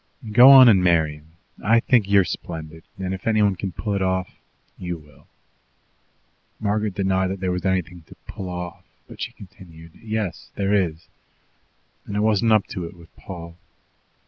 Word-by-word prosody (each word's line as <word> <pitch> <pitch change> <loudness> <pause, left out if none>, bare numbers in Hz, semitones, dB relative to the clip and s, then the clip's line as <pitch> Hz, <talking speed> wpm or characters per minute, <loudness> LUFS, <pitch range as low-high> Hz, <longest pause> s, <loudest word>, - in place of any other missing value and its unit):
"Go 125 +4 +8
on 135 -2 +10
and 95 -5 +5
marry 80 -4 +2
him. 80 +2 -22 0.3
I 115 +3 +4
think 115 -4 +2
you're 100 -1 +5
splendid; 80 -1 -7
and 95 0 -3
if 95 +2 -7
anyone 105 -3 +3
can 95 +1 -5
pull 105 +3 -4
it 100 - -1
off, 95 -1 -1 0.4
you 90 -1 -5
will." 75 -2 -20 1.3
Margaret 105 -1 -1
denied 95 -1 +1
that 95 +1 -4
there 90 -1 -1
was 90 +1 -3
anything 90 -2 -1
to - - -14
"pull 95 -2 -7
off," 90 -1 -7 0.2
but - - -12
she - - -3
continued: 85 -4 -14
"Yes, 110 -5 -4
there 100 0 0
is, 85 -5 -1 1.0
and 100 - -4
I - - +1
wasn't 110 +1 +2
up 110 -2 +4
to 90 - -5
it 85 - -10
with 85 -1 -18
Paul. 85 -2 -10
95 Hz, 170 wpm, -22 LUFS, 85-105 Hz, 1.3 s, on